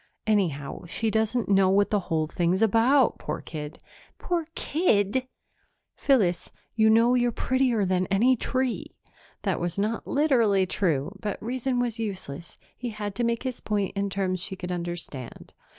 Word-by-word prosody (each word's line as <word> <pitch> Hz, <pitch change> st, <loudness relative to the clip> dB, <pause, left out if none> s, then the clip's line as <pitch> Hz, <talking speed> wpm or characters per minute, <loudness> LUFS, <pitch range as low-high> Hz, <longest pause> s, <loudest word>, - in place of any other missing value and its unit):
"Anyhow, 175 Hz, -10 st, 0 dB
she 220 Hz, +5 st, -1 dB
doesn't 220 Hz, +2 st, 0 dB
know 195 Hz, -1 st, +4 dB
what 200 Hz, +1 st, +3 dB
the 210 Hz, -, +3 dB
whole 160 Hz, -1 st, +1 dB
thing's 175 Hz, +5 st, +1 dB
about, 235 Hz, +5 st, +4 dB
poor -, -, -4 dB
kid!" 150 Hz, -2 st, -7 dB, 0.4 s
"Poor 340 Hz, -3 st, -2 dB
kid!" 255 Hz, -, +1 dB, 0.7 s
"Phyllis, 195 Hz, -, +2 dB, 0.2 s
you 220 Hz, -1 st, +4 dB
know 230 Hz, +2 st, +5 dB
you're 245 Hz, -1 st, +2 dB
prettier 250 Hz, -3 st, +1 dB
than 185 Hz, 0 st, +1 dB
any 230 Hz, +7 st, +4 dB
tree." 255 Hz, +1 st, -2 dB, 0.5 s
That -, -, 0 dB
was 175 Hz, +1 st, -3 dB
not 215 Hz, +3 st, -1 dB
literally 235 Hz, -10 st, +3 dB
true, 175 Hz, -2 st, -1 dB
but 205 Hz, 0 st, -4 dB
reason 250 Hz, +2 st, -2 dB
was 240 Hz, -2 st, -1 dB
useless; 185 Hz, -7 st, -6 dB, 0.2 s
he 245 Hz, -, -5 dB
had 210 Hz, -2 st, -5 dB
to 240 Hz, -, -2 dB
make 235 Hz, 0 st, 0 dB
his 255 Hz, -2 st, -4 dB
point 205 Hz, -2 st, -2 dB
in 200 Hz, 0 st, -1 dB
terms 190 Hz, -1 st, -1 dB
she 180 Hz, +2 st, -6 dB
could 180 Hz, -1 st, -6 dB
understand. 175 Hz, -8 st, -6 dB
210 Hz, 155 wpm, -26 LUFS, 185-240 Hz, 0.7 s, know